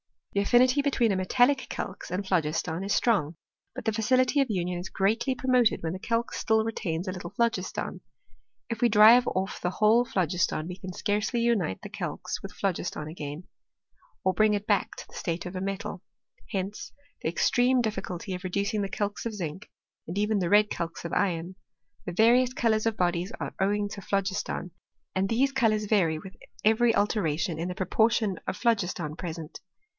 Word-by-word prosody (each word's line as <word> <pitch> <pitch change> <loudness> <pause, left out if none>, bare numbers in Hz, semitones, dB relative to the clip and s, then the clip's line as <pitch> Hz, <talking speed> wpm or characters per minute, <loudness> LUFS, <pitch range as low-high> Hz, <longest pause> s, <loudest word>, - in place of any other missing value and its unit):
The 200 - +1
affinity 250 +6 +4
between 265 -6 +2
a - - +1
metallic 245 +8 +2
calx - - -5
and 185 +3 -3
phlogiston 165 -1 0
is 200 - 0
strong; 180 -10 +2 0.4
but - - -6
the 220 - +2
facility 255 +5 +2
of 270 -3 +2
union 180 -3 -1
is 180 - -6
greatly 225 +7 +1
promoted 250 -7 +2
when 160 - -1
the 185 - -5
calx 230 +3 -1
still 220 0 +2
retains 185 -6 -3
a - - -1
little 180 -2 -6
phlogiston. 225 -3 -1 0.7
If 230 -2 -4
we 240 - +5
drive 225 +4 +7
off 190 +1 -2
the 180 - 0
whole 215 +6 +4
phlogiston 180 -6 0
we 180 0 -6
can 185 -2 -7
scarcely 210 +4 0
unite 220 - +1
the - - -7
calx - - -4
with - - -8
phlogiston 170 -5 -2
again, 150 0 -6 0.8
or 185 - +2
bring 215 +2 +3
it 205 0 -3
back 205 -3 +1
to - - -9
the - - -21
state 170 0 -3
of 180 +1 -6
a 185 - -3
metal: 195 -1 -4 0.5
hence 195 +1 -4 0.3
the - - 0
extreme 250 +7 +3
difficulty 195 -4 -3
of 180 +1 -6
re - - -2
ducing 200 +3 -1
the 195 - -2
calx 205 +2 -3
of 225 -2 -3
zinc, 175 -1 -5 0.4
and 170 +4 -5
even 210 0 +1
the 175 -2 0
red 210 +1 +5
calx 165 0 -4
of 170 - -4
iron. 180 -2 0 0.5
The 175 - -4
various 240 +5 +4
colours 225 -3 +1
of 225 -1 -1
bodies 175 +3 0
are - - -4
owing 205 +1 +1
to 200 - -7
phlogis 195 +1 0
ton, 180 - -5 0.4
and 190 +1 +1
these 265 +4 +2
colours 220 -5 +2
vary 185 -7 +2
with 190 +4 -10 0.3
every 225 +2 +4
alteration 170 -6 0
in 170 - -2
the 180 - -4
proportion 215 +1 +1
of - - -2
phlogiston 180 -9 0
present. 165 -2 -6
200 Hz, 185 wpm, -27 LUFS, 180-225 Hz, 0.8 s, drive